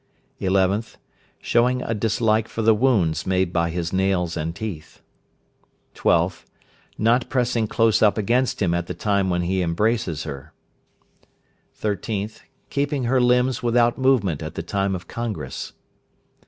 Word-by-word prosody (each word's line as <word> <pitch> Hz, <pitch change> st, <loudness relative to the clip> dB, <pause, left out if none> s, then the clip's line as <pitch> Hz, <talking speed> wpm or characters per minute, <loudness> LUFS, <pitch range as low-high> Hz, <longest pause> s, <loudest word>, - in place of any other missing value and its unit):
11th. 95 Hz, +3 st, +1 dB, 0.4 s
Showing 125 Hz, +2 st, +1 dB
a 115 Hz, -, -2 dB
dislike 110 Hz, 0 st, +1 dB
for 115 Hz, -, -4 dB
the 110 Hz, +1 st, +6 dB
wounds 105 Hz, -, +1 dB
made 95 Hz, -1 st, +1 dB
by 85 Hz, 0 st, +1 dB
his 85 Hz, +1 st, -3 dB
nails 95 Hz, -3 st, +1 dB
and 80 Hz, +1 st, -3 dB
teeth. 95 Hz, -8 st, -7 dB, 0.9 s
12th. -, -, +1 dB, 0.5 s
Not 115 Hz, +3 st, +2 dB
pressing 120 Hz, -4 st, 0 dB
close 115 Hz, 0 st, +2 dB
up 105 Hz, -1 st, +4 dB
against 120 Hz, +2 st, +1 dB
him 85 Hz, -3 st, +1 dB
at 85 Hz, 0 st, -1 dB
the 90 Hz, -, -5 dB
time 100 Hz, +1 st, 0 dB
when 90 Hz, -1 st, 0 dB
he 95 Hz, +2 st, 0 dB
embraces 90 Hz, -1 st, 0 dB
her. 70 Hz, 0 st, -8 dB, 1.3 s
13th. 105 Hz, 0 st, -3 dB, 0.3 s
Keeping 140 Hz, -1 st, -1 dB
her 125 Hz, +2 st, +2 dB
limbs 125 Hz, +1 st, +2 dB
without 120 Hz, 0 st, +2 dB
movement 115 Hz, -, +2 dB
at 80 Hz, +1 st, -6 dB
the -, -, -4 dB
time 95 Hz, +2 st, -1 dB
of 90 Hz, -1 st, -8 dB
congress. 115 Hz, -3 st, -5 dB
105 Hz, 140 wpm, -23 LUFS, 90-120 Hz, 1.3 s, the